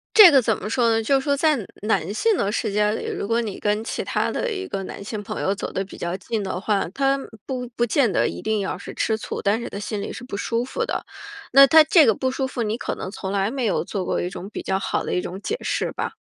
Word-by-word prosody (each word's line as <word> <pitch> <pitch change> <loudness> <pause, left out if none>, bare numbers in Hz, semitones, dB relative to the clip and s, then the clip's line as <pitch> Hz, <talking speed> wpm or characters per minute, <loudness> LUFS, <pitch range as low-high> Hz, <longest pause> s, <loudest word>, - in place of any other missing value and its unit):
这 415 -6 +11
个 275 -2 +6
怎 225 -3 +1
么 210 - -5
说 235 0 +2
呢？ 225 0 +2
就 270 +4 +3
是 - - -6
说 280 0 +1
在 310 +1 +3 0.3
男 200 -4 0
性 445 - +2
的 200 - 0
世 215 -1 -1
界 210 +1 +2
里， 220 - -3
如 - - -3
果 230 +2 +2
你 220 -4 -4
跟 210 +1 0
其 - - -3
他 - - -1
的 - - -2
一 380 -3 -4
个 195 - -3
男 195 - -7
性 210 0 -5
朋 205 - -5
友 195 - +1
走 200 - -5
得 190 - -2
比 195 - -12
较 175 +1 -3
近 215 +3 -3
的 190 - -3
话， 200 -1 0
他 275 +6 +1 0.3
不 250 -2 -4
不 240 - +2
见 240 -1 +2
得 - - +2
一 - - -5
定 220 -1 0
要 190 -2 -3
是 200 - -9
吃 220 - +1
醋， - - -5
但 210 +3 +1
是 - - -5
他 - - -7
心 210 0 -4
里 - - -5
是 - - -8
不 250 - -6
舒 230 +3 -1
服 470 - -3
的。 - - -3 0.5
那 275 +1 +9
他 315 +2 +8
这 310 0 +6
个 220 -4 +4
不 260 +4 -1
舒 265 0 -1
服， 250 -2 -3
你 215 +1 -1
可 - - -3
能 185 - -6
从 190 -2 -5
来 200 +1 0
没 265 -2 -2
有 205 - +1
做 195 -3 -3
过 - - 0
一 175 - -2
种 185 +2 -8
比 - - -6
较 190 0 0
好 - - -1
的 - - -3
一 180 - +1
种 185 +2 -6
解 450 - -2
释 - - -1
吧？ - - -4
220 Hz, 310 characters per minute, -23 LUFS, 200-265 Hz, 0.5 s, 这